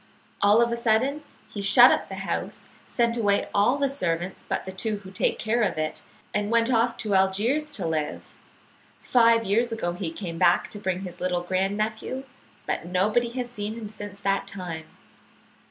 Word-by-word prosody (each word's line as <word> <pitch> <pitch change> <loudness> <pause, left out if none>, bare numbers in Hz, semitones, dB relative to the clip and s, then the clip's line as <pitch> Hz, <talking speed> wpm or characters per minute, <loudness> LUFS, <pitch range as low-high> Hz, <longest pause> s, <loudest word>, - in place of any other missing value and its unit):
All 210 +3 +6
of 235 - 0
a - - +1
sudden 235 +6 +1 0.3
he 205 - -6
shut 200 - +7
up - - 0
the - - -5
house, - - -4 0.2
sent 235 -1 +1
away 205 -3 +2
all 210 +7 +3
the 280 -1 +1
servants 180 -8 -2
but - - -2
the 190 - -5
two 210 +3 -2
who 190 - -10
take 190 - 0
care 230 +2 0
of 210 - 0
it, 155 0 -3 0.3
and 205 0 -1
went 230 +2 +2
off 235 +1 +2
to 215 -3 -2
Algiers 215 +11 +1
to 195 -10 -3
live. 155 -2 -3 0.6
Five 230 -2 +4
years 230 +5 +2
ago 220 -6 -2
he 175 -2 -4
came 165 -2 -6
back 175 - +3
to 205 - -4
bring 185 -2 -2
his 180 -2 -8
little 180 -1 -1
grand 190 +3 0
nephew, 220 +5 -3 0.4
but - - -3
nobody 210 +7 +1
has 245 -1 -4
seen 215 -1 -4
him 225 -2 -6
since 205 -1 -9
that 195 -1 0
time. 175 -5 -6
205 Hz, 185 wpm, -25 LUFS, 185-235 Hz, 0.6 s, shut